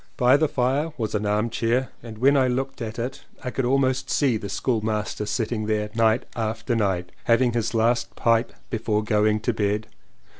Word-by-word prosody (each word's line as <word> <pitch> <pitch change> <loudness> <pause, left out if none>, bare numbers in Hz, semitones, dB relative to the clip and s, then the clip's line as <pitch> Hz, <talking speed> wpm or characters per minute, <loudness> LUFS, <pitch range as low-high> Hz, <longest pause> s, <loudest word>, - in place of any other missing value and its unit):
By 125 -1 +5
the 155 +2 +3
fire 140 +5 0
was 110 -4 -2
an 105 0 -1
armchair 115 +4 0
and 115 -2 -9
when 135 +5 +4
I 130 -2 +4
looked 135 +1 -2
at 110 0 -5
it 125 +4 -4 0.2
I 125 - -3
could 135 - -1
almost 130 0 +1
see 135 -5 +2
the 105 -2 -4
school 115 +3 0
master 105 -1 -2
sitting 110 -2 -2
there 105 -1 -1
night 115 +1 +3
after 110 +1 -2
night 95 -5 0
having 120 0 +3
his 115 0 -1
last 115 +2 +1
pipe 115 0 +2 0.2
before 110 -2 0
going 105 0 +2
to 120 - 0
bed. 105 0 0
115 Hz, 185 wpm, -24 LUFS, 110-125 Hz, 0.2 s, By